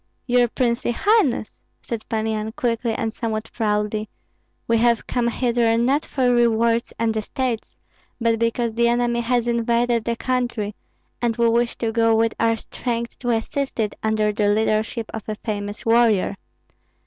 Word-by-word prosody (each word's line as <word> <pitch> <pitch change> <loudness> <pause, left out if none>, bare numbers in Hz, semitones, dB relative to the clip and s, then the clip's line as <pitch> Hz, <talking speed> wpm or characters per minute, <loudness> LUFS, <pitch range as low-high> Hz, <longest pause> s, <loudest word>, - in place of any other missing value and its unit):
"Your 245 -1 +3
princely 235 0 0
highness," 395 - +2 0.2
said 230 -2 -6
Pan 220 -1 -1
Yan, 220 0 -2
quickly 230 -1 -1
and 225 -1 -2
somewhat 225 -2 -3
proudly, 210 -1 -1 0.6
"we 230 -1 +3
have 235 -1 +2
come 245 -2 0
hither 235 -1 +1
not 270 +6 +2
for 250 -3 +1
rewards 235 -1 +2
and 225 -1 0
estates, 230 +2 -3 0.4
but 230 -1 +1
because 230 0 0
the 235 +1 +2
enemy 240 0 +1
has 240 0 0
invaded 235 0 +1
the 235 - 0
country, 240 -4 -2 0.5
and 235 -2 0
we 235 0 +3
wish 235 +1 +1
to 225 -1 -1
go 225 0 +3
with 225 0 +2
our 230 0 +3
strength 235 +1 -4
to 245 - -3
assist 240 +4 -1
it 210 -2 0
under 215 -1 +1
the 205 -1 +1
leadership 220 +2 +1
of 220 -1 -6
a 215 - -2
famous 205 -1 -5
warrior. 225 -4 +3
230 Hz, 160 wpm, -22 LUFS, 220-240 Hz, 0.6 s, Your